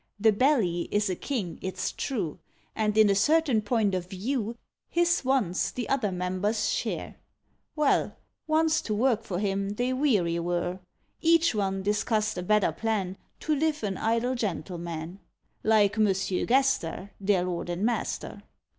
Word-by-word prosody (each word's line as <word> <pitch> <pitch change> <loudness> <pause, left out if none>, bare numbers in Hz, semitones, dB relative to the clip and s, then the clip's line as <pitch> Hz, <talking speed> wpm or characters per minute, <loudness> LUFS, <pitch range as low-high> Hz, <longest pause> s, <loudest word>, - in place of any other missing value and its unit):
The 220 +1 +5
Belly 210 - +2
is 205 -2 +1
a - - -1
king, 200 - -4
it's 185 -1 -3
true, 200 - -3 0.4
And 215 -1 0
in 215 -1 +7
a 200 - +4
certain 275 +2 +3
point 210 -2 +1
of 180 -1 -3
view 225 +3 -3 0.3
His 340 -2 +2
wants 255 -9 +1
the 245 - -4
other 245 -8 +1
members 185 +4 -1
share. - - -3 0.6
Well, 300 -2 +1 0.3
once 315 0 +3
to 215 - -2
work 230 0 +2
for 190 -5 -4
him 200 0 -1
they 245 +3 0
weary 205 - +2
were; 175 +1 -2 0.4
Each 330 -1 +4
one 195 -2 -1
discussed 215 +1 0
a - - -2
better 210 -1 +2
plan, 195 0 -2 0.3
To 310 - 0
live 305 -2 0
an 195 -3 -2
idle 230 +3 +1
gentleman, 175 -5 -4 0.4
Like 215 -1 +3
Monsieur 195 -3 +1
Gaster, 245 -8 +1
Their 195 -2 +2
lord 175 -1 -3
and 175 +4 -1
master. 240 0 -2
210 Hz, 150 wpm, -27 LUFS, 185-250 Hz, 0.6 s, in